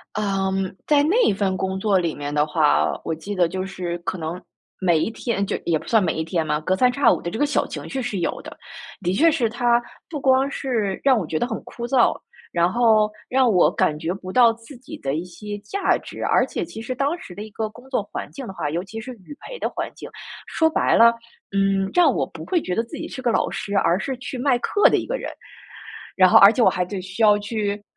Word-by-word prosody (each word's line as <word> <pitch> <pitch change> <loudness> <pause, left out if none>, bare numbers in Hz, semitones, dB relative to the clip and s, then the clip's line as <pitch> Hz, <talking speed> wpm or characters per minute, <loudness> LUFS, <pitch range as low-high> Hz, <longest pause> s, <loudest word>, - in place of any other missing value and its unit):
嗯， 195 -2 -1
在 295 -1 +4
那 370 - +3
份 195 -1 -1
工 190 0 -2
作 200 -1 +2
里 170 -3 0
面 145 0 -5
的 150 0 +2
话， 155 -1 +2 0.2
我 160 - -2
记 180 +6 -6
得 175 -2 +3
就 185 +2 -4
是 180 -3 -4
可 170 +1 -4
能 165 +2 -5 0.4
每 175 -4 +3
一 220 - 0
天 225 -3 -2
就 - - -2
也 165 -2 +2
不 - - -14
算 220 -3 +3
每 - - 0
一 160 - -2
天 165 0 -1
嘛， 150 0 0
隔 185 +4 0
三 250 +6 +3
差 280 +3 +4
五 - - 0
的 170 - -4
这 220 - -5
个 290 - +3
小 295 - +1
情 - - -7
绪 270 - -3
是 245 -6 -3
有 170 - -2
的。 - - -10 0.5
的 180 -1 0
确 325 - +4
是 245 -8 0
它 240 0 +2 0.3
不 295 -4 -5
光 265 +1 +3
是 220 -9 -2
让 270 -2 +5
我 200 - -2
觉 155 0 -2
得 240 - 0
很 220 - -4
枯 235 0 -7
燥， 260 -2 +3 0.4
然 170 +1 +2
后 220 -3 +3 0.2
让 255 -2 +3
我 180 -3 +4
感 150 - +1
觉 165 +3 -2
不 185 -1 -8
到 235 +1 +5
自 230 +4 -14
己 255 +2 -10
的 135 +1 -3
一 165 +3 -3
些 205 +4 -7
价 390 - 0
值。 - - -10
而 - - +3
且 - - -4
其 - - -9
实 230 +3 -4
当 280 +6 -1
时 185 - -11
的 205 - -8
一 215 - -7
个 220 +1 -3
工 245 +5 -16
作 255 -6 0
环 - - -6
境 275 - -8
的 195 - -7
话， 165 -5 -3
尤 170 +4 -2
其 220 +4 -8
是 255 +4 -8
语 235 +6 -13
培 - - -9
的 - - -1
环 - - -5
境， - - -9 0.4
说 320 0 +1
白 315 - +2
了， 235 0 +7 0.4
嗯， 195 -1 +1
让 355 -1 +4
我 - - 0
不 - - -10
会 350 -4 +1
觉 180 - -3
得 225 - +1
自 230 - -10
己 - - -5
是 - - -8
个 250 -2 0
老 - - +1
师， 200 - -5
而 180 -1 +2
是 265 +2 -3
去 260 0 -6
卖 250 -1 +2
课 410 - +3
的 - - +3
一 - - -4
个 - - -2
人。 - - -6 0.9
然 185 -1 +6
后 - - +7
而 200 +1 +9
且 240 - 0
我 - - +6
还 180 - -1
得 185 +1 -5
需 190 +4 -3
要 210 -1 +6
去 205 -1 -3
205 Hz, 275 characters per minute, -22 LUFS, 180-250 Hz, 0.9 s, 而